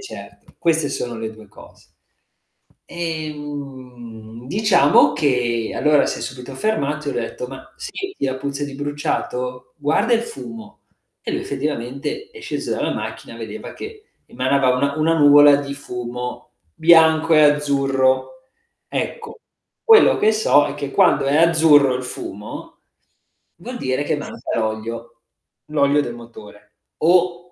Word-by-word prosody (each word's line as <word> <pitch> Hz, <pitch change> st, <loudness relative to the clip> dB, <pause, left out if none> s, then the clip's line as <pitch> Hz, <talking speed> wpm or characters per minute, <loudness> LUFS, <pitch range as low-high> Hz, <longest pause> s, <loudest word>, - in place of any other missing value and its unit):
certo, 400 Hz, -, -12 dB
queste 160 Hz, -3 st, +1 dB
sono 120 Hz, -1 st, -4 dB
le 110 Hz, 0 st, -5 dB
2 110 Hz, -1 st, -14 dB
cose. -, -, -17 dB, 1.0 s
Ehm, 140 Hz, -8 st, -7 dB
diciamo 200 Hz, -7 st, +4 dB
che 120 Hz, -6 st, 0 dB
allora 150 Hz, -1 st, +3 dB
si -, -, -3 dB
è -, -, -7 dB
subito 130 Hz, +1 st, -7 dB
fermato 150 Hz, -7 st, -1 dB
e -, -, +1 dB
ho -, -, -5 dB
detto: 120 Hz, +1 st, -4 dB
"Ma 135 Hz, +1 st, -11 dB
senti 390 Hz, -, -6 dB
la 130 Hz, -1 st, -1 dB
puzza 140 Hz, +1 st, -4 dB
di 140 Hz, -1 st, -8 dB
bruciato? 145 Hz, -3 st, -4 dB
Guarda 200 Hz, +11 st, +1 dB
il 230 Hz, -, +3 dB
fumo." 120 Hz, -, -10 dB, 0.4 s
E -, -, -4 dB
lui -, -, -1 dB
effettivamente, 140 Hz, -, -4 dB
è 440 Hz, -, -12 dB
sceso -, -, -4 dB
dalla -, -, -1 dB
macchina -, -, -6 dB
e -, -, -11 dB
vedeva -, -, -8 dB
che 430 Hz, 0 st, -10 dB, 0.2 s
emanava 130 Hz, 0 st, +1 dB
una 140 Hz, +2 st, 0 dB
una 160 Hz, +1 st, +2 dB
nuvola 145 Hz, -1 st, +7 dB
di 140 Hz, -1 st, -5 dB
fumo 125 Hz, -2 st, -7 dB, 0.2 s
bianco 160 Hz, 0 st, +5 dB
e 155 Hz, -, +6 dB
azzurro. 140 Hz, -, +1 dB, 0.5 s
Ecco, 450 Hz, 0 st, -5 dB, 0.5 s
quello 450 Hz, -1 st, +6 dB
che 220 Hz, -, +3 dB
so 145 Hz, -9 st, +3 dB
è 145 Hz, -, -5 dB
che 140 Hz, -1 st, -5 dB
quando 180 Hz, -7 st, +3 dB
è 140 Hz, -, +2 dB
azzurro 160 Hz, -5 st, +5 dB
il 130 Hz, -, -3 dB
fumo, 105 Hz, -4 st, -8 dB, 0.8 s
vuol 245 Hz, +9 st, -8 dB
dire 130 Hz, +1 st, -1 dB
che 150 Hz, -, 0 dB
manca -, -, -6 dB
l'olio, 115 Hz, +2 st, -4 dB, 0.5 s
l'olio 145 Hz, -1 st, +2 dB
del 120 Hz, -, -5 dB
motore, 115 Hz, -3 st, -14 dB, 0.3 s
o 175 Hz, +1 st, +3 dB
140 Hz, 140 wpm, -20 LUFS, 125-160 Hz, 1.0 s, nuvola